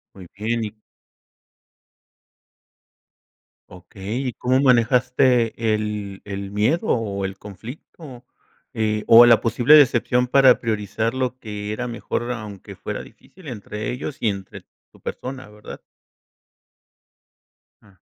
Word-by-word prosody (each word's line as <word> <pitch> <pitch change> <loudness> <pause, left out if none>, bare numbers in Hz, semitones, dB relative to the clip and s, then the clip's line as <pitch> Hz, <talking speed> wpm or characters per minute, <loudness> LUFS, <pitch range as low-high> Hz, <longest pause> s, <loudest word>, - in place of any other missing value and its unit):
Muy 90 -3 -12
bien 115 +2 -1
y 105 - -7 3.0
Okey, 95 +5 -7
¿y 125 - -3
cómo 130 +1 +1
manejaste 125 -2 +2
el 105 -2 -4
el 100 -1 -6
miedo 130 - 0
o 100 -4 -1
el 95 0 -4
conflicto? 125 - -11 0.5
Eh, 110 -1 -1
o 115 +1 +9
la 115 -2 +6
posible 120 +6 +4
decepción 125 -3 +4
para 130 -1 +5
priorizar 110 +1 -2
lo 130 -1 -2
que 105 -1 -6
era 125 +3 -3
mejor 120 0 -4
aunque 105 -4 -9
fuera - - -5
difícil 185 -4 -17
entre 105 -3 -6
ellos 130 +3 -6
y 115 - 0
entre 95 -1 -7 0.3
tu - - -21
persona 130 -1 -7
¿verdad? 105 0 -11 2.0
Jum. 100 -3 -23
115 Hz, 115 wpm, -22 LUFS, 105-125 Hz, 3.0 s, o